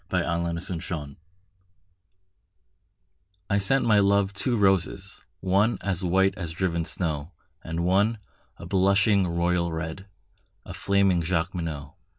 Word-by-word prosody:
The -, -, +1 dB
White 85 Hz, 0 st, -2 dB
Flag 80 Hz, -6 st, -5 dB, 2.4 s
I 100 Hz, -, +3 dB
sent 125 Hz, +7 st, +2 dB
my 105 Hz, -3 st, +5 dB
love 100 Hz, 0 st, +2 dB
two 120 Hz, +4 st, 0 dB
roses, 95 Hz, -1 st, 0 dB, 0.2 s
one 100 Hz, +5 st, +2 dB
As 95 Hz, -2 st, -2 dB
white 95 Hz, +2 st, +2 dB
as 85 Hz, -4 st, -5 dB
driven 85 Hz, -2 st, -1 dB
snow, 80 Hz, -2 st, -3 dB, 0.3 s
And 85 Hz, +1 st, -3 dB
one 100 Hz, +5 st, +2 dB, 0.4 s
a -, -, -10 dB
blushing 100 Hz, 0 st, +3 dB
royal 85 Hz, 0 st, 0 dB
red, 80 Hz, +4 st, -5 dB, 0.6 s
A -, -, -8 dB
flaming 100 Hz, -3 st, +2 dB
Jacqueminot. 80 Hz, -3 st, -3 dB
95 Hz, 120 wpm, -26 LUFS, 85-100 Hz, 2.4 s, my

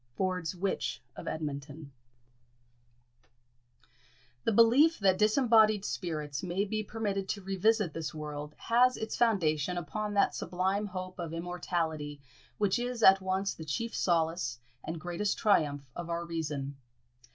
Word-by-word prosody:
Ford's 185 Hz, -3 st, -1 dB
Witch 190 Hz, +2 st, -2 dB, 0.2 s
of -, -, -8 dB
Edmonton. 145 Hz, -1 st, -5 dB, 2.5 s
The -, -, +3 dB
belief 245 Hz, +9 st, +6 dB
that 190 Hz, -2 st, +3 dB
disembodied 215 Hz, -2 st, +4 dB
spirits 150 Hz, -5 st, -3 dB
may 185 Hz, +2 st, -1 dB
be 215 Hz, +1 st, -2 dB
permitted 205 Hz, -3 st, -3 dB
to 200 Hz, -, -3 dB
revisit 195 Hz, -1 st, +1 dB
this 160 Hz, -2 st, -4 dB
world 150 Hz, -1 st, -6 dB
has 250 Hz, +2 st, +3 dB
its 220 Hz, -, -4 dB
foundation 180 Hz, -7 st, +1 dB
upon 210 Hz, +4 st, -3 dB
that 200 Hz, -, +3 dB
sublime 190 Hz, +3 st, -1 dB
hope 185 Hz, -1 st, -6 dB
of 165 Hz, -2 st, -4 dB
immortality 165 Hz, -4 st, -3 dB, 0.4 s
which 205 Hz, +2 st, +2 dB
is 245 Hz, -1 st, -3 dB
at 190 Hz, 0 st, +8 dB
once 190 Hz, +1 st, -1 dB
the 160 Hz, -, -9 dB
chief 230 Hz, +10 st, -3 dB
solace 165 Hz, -8 st, +1 dB, 0.3 s
and 165 Hz, 0 st, -5 dB
greatest 175 Hz, +5 st, -2 dB
triumph 150 Hz, -9 st, +2 dB
of 175 Hz, -1 st, -6 dB
our 170 Hz, 0 st, -2 dB
reason. 150 Hz, -5 st, -4 dB
185 Hz, 130 wpm, -31 LUFS, 160-210 Hz, 2.5 s, at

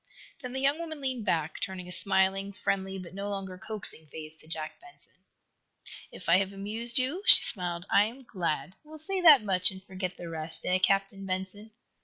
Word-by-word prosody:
Then 250 Hz, -2 st, -7 dB
the 265 Hz, -, -3 dB
young 280 Hz, +3 st, +1 dB
woman 320 Hz, -2 st, -6 dB
leaned 260 Hz, -5 st, -3 dB
back, 160 Hz, -1 st, -1 dB
turning 185 Hz, -2 st, -5 dB
a -, -, -9 dB
smiling, 195 Hz, +2 st, +2 dB
friendly 195 Hz, 0 st, -2 dB
but 180 Hz, -2 st, -10 dB
no 200 Hz, +1 st, -5 dB
longer 195 Hz, -2 st, -5 dB
coaxing 195 Hz, -7 st, -3 dB
face 155 Hz, +1 st, -9 dB
to 155 Hz, -, -16 dB
Jack 160 Hz, -, -6 dB
Benson. 360 Hz, 0 st, -15 dB, 1.0 s
"If 180 Hz, -, -11 dB
I 170 Hz, -, +6 dB
have 195 Hz, 0 st, -1 dB
amused 215 Hz, +4 st, 0 dB
you," 270 Hz, +9 st, +1 dB
she -, -, +10 dB
smiled, 175 Hz, -3 st, -1 dB
"I 205 Hz, -, +4 dB
am 245 Hz, +5 st, -9 dB
glad. 180 Hz, -5 st, -3 dB
We 300 Hz, -, -21 dB
will 315 Hz, -, -10 dB
say 375 Hz, +5 st, -2 dB
that 300 Hz, -9 st, +8 dB
much 185 Hz, -3 st, +5 dB
and 190 Hz, 0 st, -8 dB
forget 185 Hz, -1 st, -5 dB
the 175 Hz, -, -8 dB
rest, 160 Hz, 0 st, -5 dB
eh, 185 Hz, +1 st, +2 dB
Captain 195 Hz, +1 st, 0 dB
Benson." 190 Hz, +3 st, -5 dB
195 Hz, 200 wpm, -28 LUFS, 180-230 Hz, 1.0 s, she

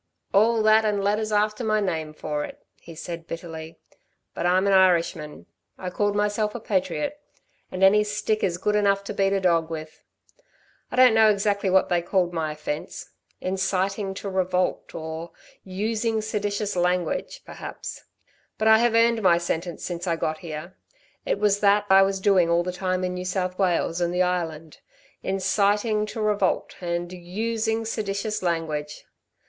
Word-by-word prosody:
"All 220 Hz, +2 st, +4 dB
that, 215 Hz, +1 st, +5 dB
and 205 Hz, -2 st, 0 dB
letters 215 Hz, +2 st, 0 dB
after 210 Hz, +2 st, +1 dB
my 215 Hz, -1 st, +2 dB
name 160 Hz, -6 st, -2 dB
for 150 Hz, -1 st, -3 dB
it," -, -, -10 dB
he 165 Hz, -, -12 dB
said, 170 Hz, 0 st, -7 dB
bitterly. 165 Hz, -1 st, -7 dB, 0.6 s
"But 175 Hz, -, -1 dB
I'm 185 Hz, +2 st, +3 dB
an 200 Hz, -, +3 dB
Irishman... 170 Hz, -5 st, +2 dB, 0.3 s
I 180 Hz, -1 st, -5 dB
called 205 Hz, +2 st, 0 dB
myself 210 Hz, +1 st, 0 dB
a -, -, -3 dB
patriot 220 Hz, -, -2 dB, 0.5 s
and 185 Hz, +1 st, -2 dB
any 210 Hz, +2 st, +6 dB
stick 210 Hz, +1 st, -1 dB
is 175 Hz, -3 st, 0 dB
good 210 Hz, +3 st, 0 dB
enough 200 Hz, -1 st, +2 dB
to 200 Hz, -, -5 dB
beat 195 Hz, -1 st, +1 dB
a 195 Hz, -, +2 dB
dog 170 Hz, -3 st, +2 dB
with. 155 Hz, -1 st, -7 dB, 0.9 s
I -, -, -3 dB
don't 255 Hz, -2 st, +7 dB
know 220 Hz, -1 st, +6 dB
exactly 200 Hz, -1 st, +1 dB
what 190 Hz, 0 st, +3 dB
they 175 Hz, -1 st, +2 dB
called 175 Hz, 0 st, 0 dB
my 160 Hz, -2 st, -1 dB
offence 150 Hz, 0 st, -6 dB, 0.3 s
'inciting 195 Hz, +1 st, -1 dB
to 200 Hz, -, -6 dB
revolt,' 185 Hz, -1 st, -1 dB
or 160 Hz, +1 st, -6 dB, 0.3 s
'using 220 Hz, +3 st, -1 dB
seditious 205 Hz, -1 st, -2 dB
language,' 180 Hz, -1 st, -1 dB
perhaps; -, -, -8 dB, 0.5 s
but 220 Hz, -, +1 dB
I 220 Hz, 0 st, +7 dB
have 235 Hz, -1 st, +2 dB
earned 230 Hz, 0 st, +4 dB
my 180 Hz, -4 st, +5 dB
sentence 170 Hz, 0 st, -3 dB
since 175 Hz, +1 st, -4 dB
I 170 Hz, -, +1 dB
got 155 Hz, -1 st, -2 dB
here. 165 Hz, +2 st, -7 dB, 0.5 s
It -, -, +1 dB
was 205 Hz, 0 st, +2 dB
that 205 Hz, 0 st, +4 dB
I 195 Hz, 0 st, +8 dB
was 195 Hz, 0 st, +1 dB
doing 190 Hz, -3 st, +3 dB
all 170 Hz, +1 st, +3 dB
the 180 Hz, -, -3 dB
time 185 Hz, 0 st, -1 dB
in 180 Hz, 0 st, -1 dB
New 180 Hz, 0 st, -5 dB
South 185 Hz, 0 st, -2 dB
Wales 175 Hz, -2 st, +1 dB
and 175 Hz, 0 st, +1 dB
the 180 Hz, +1 st, +2 dB
Island 165 Hz, -3 st, -3 dB, 0.4 s
'inciting 205 Hz, +3 st, +1 dB
to 220 Hz, +1 st, -5 dB
revolt' 205 Hz, -3 st, 0 dB
and 175 Hz, 0 st, -3 dB
'using 220 Hz, +5 st, -2 dB
seditious 215 Hz, -1 st, -2 dB
language' 155 Hz, -4 st, -3 dB
190 Hz, 165 wpm, -25 LUFS, 175-210 Hz, 0.9 s, I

